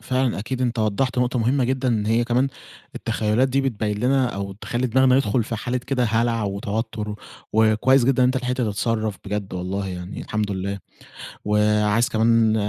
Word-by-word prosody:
فعلًا 130 -1 0
أكيد 125 +5 -3
أنتَ 120 -1 -1
وضَّحت 110 +4 0
نقطة 125 0 +1
مهمة 125 +3 +2
جدًا، 130 +1 0
إن 110 -3 0
هي 115 +2 +2
كمان 125 +3 +1 0.5
التخيلات 110 +5 0
دي 135 +1 +1
بتبيِّن 105 -6 -2
لنا 130 +3 +2
أو 100 0 -4
تخلّي 120 +5 -3
دماغنا 130 +1 +4
يدخل 115 -3 +1
في 115 - -4
حالة 125 +3 -2
كده 125 0 -1
هلع 115 0 +1
وتوتر 105 +2 -3
و - - -4 0.4
وكويس 110 +4 +4
جدًا 130 0 +3
إن - - +5
أنتَ 130 - 0
لحقت 125 -1 -1
تتصرف 110 -2 -1
بجد 100 -1 -4
والله 95 +2 -3
يعني 90 +1 -6
الحمد 105 -1 -2
لله. 100 +1 -3 0.7
وعايز 105 +3 +2
كمان 115 -1 +3
115 Hz, 175 wpm, -23 LUFS, 105-125 Hz, 0.7 s, إن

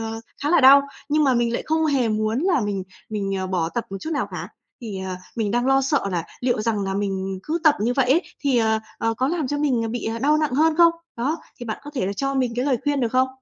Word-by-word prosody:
ờ, 225 0 -4 0.2
khá 290 - 0
là 345 - +5
đau, 275 +1 +8 0.3
nhưng 305 +1 +3
mà 265 -2 +3
mình 235 -1 +1
lại - - -2
không 320 0 +1
hề 270 -6 +2
muốn 215 +1 0
là 350 -4 +2
mình 205 -3 -2 0.3
mình, 200 -2 -2
à, 190 0 -2
bỏ 180 -3 -1
tập 230 +6 -3
một 195 - -4
chút 320 - -5
nào 280 -9 -1
cả. 175 -1 -6 0.3
Thì, 215 -5 -6
ờ, 190 -1 -4 0.2
mình 220 -3 0
đang 240 +3 +1
lo 270 0 +4
sợ 270 -3 +1
là 175 -3 -2 0.2
liệu 245 -3 +1
rằng 215 -2 0
là 195 0 -2
mình 195 -1 -2
cứ 320 +2 -2
tập 305 -2 +6
như 230 +4 +1
vậy 260 -1 +2
ấy, 330 +7 +4 0.2
thì, 275 -4 +2
ờ, 220 -1 +2 0.2
ờ, 225 0 0
có 255 +4 0
làm 325 -2 -1
cho 290 - -1
mình, 270 -6 +1
ờ, 225 - -2
bị, 240 +2 -4
ờ, 225 +1 -2
đau 295 +5 +3
nặng 305 -4 0
hơn 310 +2 +3
không? 340 -1 +6 0.2
Đó, 270 +7 -1 0.2
thì 240 - -6
bạn 220 - -4
có 290 - -7
thể 250 -9 -1
là 200 - -1
cho 275 +6 -2
mình 255 -3 0
cái 250 - 0
lời 275 -3 +2
khuyên 290 -1 +1
được 240 - +1
không? 255 +1 +3
245 Hz, 285 wpm, -23 LUFS, 215-285 Hz, 0.3 s, đau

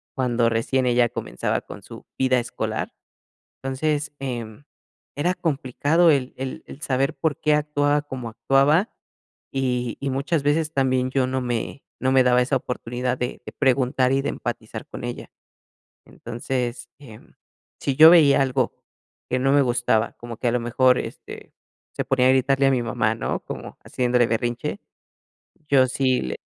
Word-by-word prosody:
cuando 120 -3 +1
recién 125 +3 0
ella 120 -1 +3
comenzaba 60 - -3
con - - -11
su - - -12
vida 130 -1 +3
escolar, 120 - -4 0.7
entonces, 145 +3 -1
em, 120 -1 -5 0.5
era 175 +5 +1
complicado 155 +2 +2
el 135 -3 0
el 130 0 -6
el 150 - -12
saber 135 +1 0
por 145 +1 -2
qué, 150 -1 +3
actuaba 145 -1 +1
como 130 -5 -6
actuaba, 135 - +2 0.6
y 125 -3 -1
y 140 -1 -2
muchas 140 +3 -1
veces, 155 +2 +1
también, 130 -2 +1
yo 130 -1 +1
no 130 0 -2
me 120 +2 -3 0.2
no 130 0 +1
me 130 - +6
daba 125 0 +4
esa 135 +2 0
oportunidad 125 0 -3
de 125 0 -4
de - - -7
preguntar 130 -1 +2
y 135 - +1
de - - -2
empatizar - - -6
con - - -8
ella. - - -6 0.8
Entonces, 120 +1 -4
em, 115 -7 -14 0.5
si 140 - -1
yo 160 +1 +10
veía 150 -5 +6
algo 130 -2 -1 0.5
que 130 - +1
no 135 +1 +2
me 140 0 +5
gustaba, 120 -3 +1
como 120 -1 -8
que 120 - 0
a - - +1
lo 125 - +1
mejor, 125 +2 +3
este, - - -8 0.4
se - - -2
ponía 130 -1 +2
a - - +6
gritarle 135 +1 +3
a 135 - +4
mi 125 -2 +1
mamá, 110 -1 0
¿no? - - -2
Como - - -8
haciéndole 125 -1 +1
berrinche, 120 - -2 0.9
yo 135 -2 +5
sí 130 0 +1
le: 65 - -4
130 Hz, 165 wpm, -23 LUFS, 125-140 Hz, 0.9 s, yo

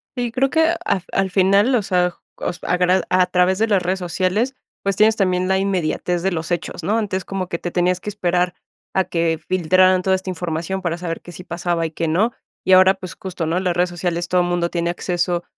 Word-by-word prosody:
Sí, 245 -2 -2
creo 265 +2 +1
que 320 +1 +3
af 185 - 0
al 195 -1 +1
final, 200 +6 +4
o 230 - +2
sea 180 -2 +1 0.2
cos 175 - -4
agra 180 +1 +2
a 185 0 +4
través 180 +1 +2
de 225 - +2
las 200 -4 +2
redes 185 +2 -1
sociales, 185 +8 -1 0.3
pues 195 -1 0
tienes 215 +2 +4
también 185 -3 +1
la 190 - +2
inmediatez 180 -2 -1
de 190 - +1
los 160 0 -4
hechos, 175 0 -3
¿no?, 210 +7 +1
antes 195 -4 -2
como 190 -2 -3
que 170 - -2
te 175 - -4
tenías 180 +1 +1
que 210 - -5
esperar 180 -3 0 0.4
a 190 - +4
que 165 -1 0
filtraran 185 +1 +4
toda 190 0 +3
esta 185 0 -5
información 175 +2 -3
para 170 -1 -1
saber 165 -2 -4
que 175 - -11
sí 180 - -10
pasaba 170 -1 -2
y 160 - -4
que 165 +1 -2
no. 195 +9 +2 0.3
Y 190 - +4
ahora, 185 +1 +7
pues 185 -3 -9
justo, 185 -3 -5
¿no?, 165 +3 0
las 180 -2 -1
redes 180 +1 +2
sociales 175 0 -2
todo 180 0 +2
mundo 175 -1 0
tiene 170 -1 -1
acceso 175 -1 -1
180 Hz, 225 wpm, -20 LUFS, 175-190 Hz, 0.4 s, ahora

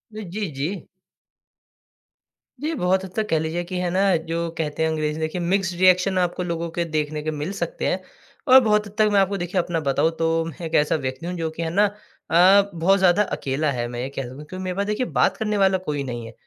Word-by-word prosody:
जी, 210 0 -4
जी। 150 +6 -4 1.7
जी, 305 +5 -3
बहुत 190 -5 +1
हद 185 - -10
तक 220 -1 -1
कह 160 - +2
लीजिए 160 +2 -2
कि 180 +1 -5
है 180 -1 -1
ना 190 0 +3
जो 170 0 -1
कहते 155 0 -2
हैं 160 - +2
अंग्रेज़ी 155 -1 -2
देखिए 160 +3 -2
मिक्स्ड 185 +1 0
रिएक्शन 185 +1 +4
आपको 180 0 -1
लोगों 170 -1 -3
के 170 - +1
देखने 155 -1 -2
के 155 - -1
मिल 150 +4 -4
सकते - - -3
हैं। - - -1 0.5
और 260 +1 +9
बहुत 210 -1 +2
हद 205 - -13
तक 215 -1 +4
मैं 200 - +4
आपको 195 +1 +1
देखिए 175 +1 -2
अपना 170 -1 -2
बताऊँ 150 +2 +1
तो 165 0 +1
मैं 165 +1 -7
एक 160 - -6
ऐसा 150 +1 +3
व्यक्ति 130 +1 -4
हूँ 180 +1 -3
जो 165 -1 -2
कि 165 +1 -5
है 165 - -2
ना 200 +5 +3
अ, 200 -1 +3
बहुत 180 +4 +3
ज़्यादा 185 +2 +4
अकेला 145 -2 -2
है। 120 -2 -2
मैं 120 0 -6
ये 130 - -3
कह 140 - -5
सकता 125 +1 -8
हूँ 150 +2 -10
क्योंकि 185 +4 -7
मेरे 185 -1 -3
पास 200 - 0
देखिए 210 +4 -1
बात - - +1
करने 210 -2 -1
वाला 190 -1 +3
कोई 150 -6 -3
नहीं 120 -3 -5
है। 115 - -10
175 Hz, 235 wpm, -23 LUFS, 155-195 Hz, 1.7 s, और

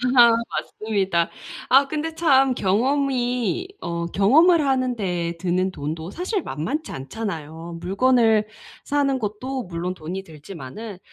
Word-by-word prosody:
아 235 -2 +8 0.2
맞습니다. 195 -6 -1 0.4
아 275 +2 +6
근데 315 +1 -3
참 270 -6 +4
경험이 250 - 0
어 170 -1 -3
경험을 300 - +5
하는데 210 -11 0
드는 185 +1 0
돈도 160 +2 -5
사실 370 +2 -2
만만치 290 - -4
않잖아요. 165 0 -6
물건을 220 +1 +3 0.4
사는 275 -2 +1
것도 245 +5 -3
물론 180 0 -4
돈이 185 +3 -6
들지만은. 175 - -9
215 Hz, 255 characters per minute, -23 LUFS, 175-265 Hz, 0.4 s, 아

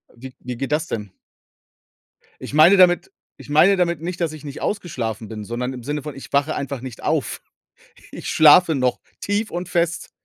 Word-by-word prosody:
Wie 130 +2 -11
wie 125 -1 -7
geht 135 +2 -4
das 155 +1 0
denn? 105 -4 -5 1.3
Ich - - -8
meine 170 +6 +7
damit 180 - +4 0.2
ich - - -14
meine 175 +7 +5
damit 170 -3 0
nicht, 175 +2 -5
dass 165 -2 0
ich 155 -1 -11
nicht 145 -1 -8
ausgeschlafen 115 - -3
bin, 110 -2 -7
sondern 125 +4 -4
im 125 - -8
Sinne 145 +3 -4
von, 150 -2 -6
ich 135 - -11
wache 145 +2 +1
einfach 140 -2 -4
nicht 130 -3 -9
auf. - - -1 0.7
Ich - - -8
schlafe 160 +1 +6
noch 125 -2 0 0.2
tief 205 +2 -1
und 175 +1 -5
fest. 175 -1 -1
150 Hz, 185 wpm, -21 LUFS, 125-175 Hz, 1.3 s, meine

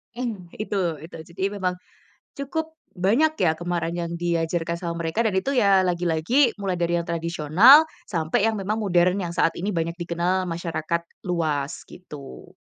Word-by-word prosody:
Mmm, 225 -8 -4
itu 215 -1 -4 0.3
itu. 165 - -10
Jadi 190 +2 -5 0.2
memang, 180 -1 0 0.6
cukup 315 +3 -4 0.2
banyak 230 - +3
ya 160 -3 +4
kemarin 175 0 -3
yang 170 0 -4
diajarkan 170 0 -1
sama 170 -1 -3
mereka, 165 +8 0
dan 215 - +1
itu 275 +8 0
ya, 195 -6 +4
lagi-lagi 180 - +1
mulai 195 -2 -1
dari 170 0 +1
yang 170 - -2
tradisional, 170 - +5 0.2
sampai 165 +3 0
yang 220 - -2
memang 205 +2 -2
modern 180 -1 +2
yang 170 -2 -4
saat 165 -2 +2
ini 190 +4 -2
banyak 170 -3 -1
dikenal 175 +2 -1
masyarakat 165 -1 -2 0.2
luas 155 -4 -2
gitu. 150 -7 -11
175 Hz, 155 wpm, -24 LUFS, 170-200 Hz, 0.6 s, tradisional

